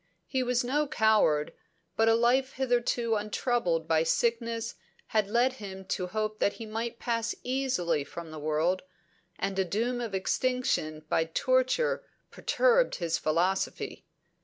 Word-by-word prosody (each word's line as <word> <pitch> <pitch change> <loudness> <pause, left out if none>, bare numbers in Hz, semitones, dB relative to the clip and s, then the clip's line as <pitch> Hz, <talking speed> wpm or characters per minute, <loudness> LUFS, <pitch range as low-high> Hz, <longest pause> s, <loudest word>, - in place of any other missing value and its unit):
He 260 - -1
was 250 0 +1
no 290 +5 +1
coward, 220 - +3 0.4
but 225 0 +4
a 225 - +5
life 255 +3 +2
hitherto 240 -2 +1
untroubled 210 -6 0
by 160 -1 +3
sickness 230 +6 0 0.4
had 215 -2 +1
led 245 +4 +3
him 190 -1 -7
to 180 - -1
hope 215 +2 -2
that 200 - +2
he 230 - -8
might 225 +2 -4
pass 230 -1 -1
easily 250 - 0
from 165 +3 -8
the 155 - -7
world, 155 +5 +1 0.6
and 195 -1 -2
a - - +4
doom 230 +7 -1
of 225 -5 -3
extinction 190 -8 0
by 165 0 +2
torture 255 - +1 0.3
perturbed - - +2
his 170 -1 -1
philosophy. 175 +5 -1
225 Hz, 140 wpm, -29 LUFS, 180-245 Hz, 0.6 s, a